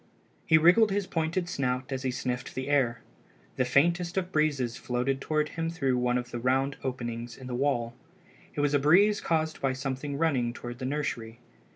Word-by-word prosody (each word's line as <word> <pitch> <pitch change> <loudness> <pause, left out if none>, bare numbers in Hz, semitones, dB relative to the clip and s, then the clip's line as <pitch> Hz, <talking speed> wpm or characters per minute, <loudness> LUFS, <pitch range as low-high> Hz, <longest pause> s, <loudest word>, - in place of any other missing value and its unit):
He 160 - +6
wriggled 180 +8 +6
his 200 0 0
pointed 165 +1 -1
snout 130 -5 -2
as 130 -1 -2
he 130 - -1
sniffed 125 0 -3
the 130 +2 -3
air. 125 -5 +2 0.6
The 130 - +2
faintest 170 - +2
of 185 -1 -1
breezes 145 -7 +1
floated 130 +2 -2
toward 150 0 0
him 165 0 -3
through 140 -6 0
one 125 0 +1
of 125 0 -5
the 120 - -4
round 135 +3 +1
openings 120 -2 -4
in 130 - -10
the 125 - -5
wall. 120 -3 0 0.6
It 145 - 0
was 145 0 +1
a 145 - +4
breeze 195 +9 +4
caused 160 -1 -1
by 135 -1 +1
something 135 +2 -4
running 135 -7 +1
toward 120 0 -8
the 130 - -4
nursery. 120 -5 -3
135 Hz, 190 wpm, -28 LUFS, 125-160 Hz, 0.6 s, He